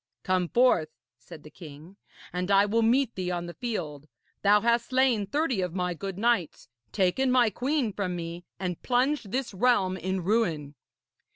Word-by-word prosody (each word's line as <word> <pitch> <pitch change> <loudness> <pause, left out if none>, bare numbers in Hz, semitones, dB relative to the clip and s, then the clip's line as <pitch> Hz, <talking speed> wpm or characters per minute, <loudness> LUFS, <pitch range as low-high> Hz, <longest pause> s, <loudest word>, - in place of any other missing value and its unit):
'Come 185 -1 +1
forth,' 235 -11 +3 0.3
said 150 +6 -13
the 155 - -13
king, 155 +3 -12 0.4
'and 180 +1 -3
I 200 0 +5
will 225 +3 +1
meet 240 +2 +2
thee 185 -1 -3
on 175 -1 -3
the 175 - -7
field. 155 - -5 0.3
Thou 205 +1 +4
hast 235 0 +1
slain 255 -6 +2
thirty 275 -4 0
of 180 -1 -3
my 180 -1 -1
good 195 +2 -6
knights, 210 - 0 0.2
taken 200 +7 +1
my 245 -3 +4
queen 255 0 -1
from 185 -3 -3
me, 170 0 -6 0.2
and 180 -3 -4
plunged 255 -3 0
this 255 -2 -2
realm 190 -3 +2
in 190 0 -3
ruin.' 170 -8 0
195 Hz, 170 wpm, -27 LUFS, 180-240 Hz, 0.4 s, I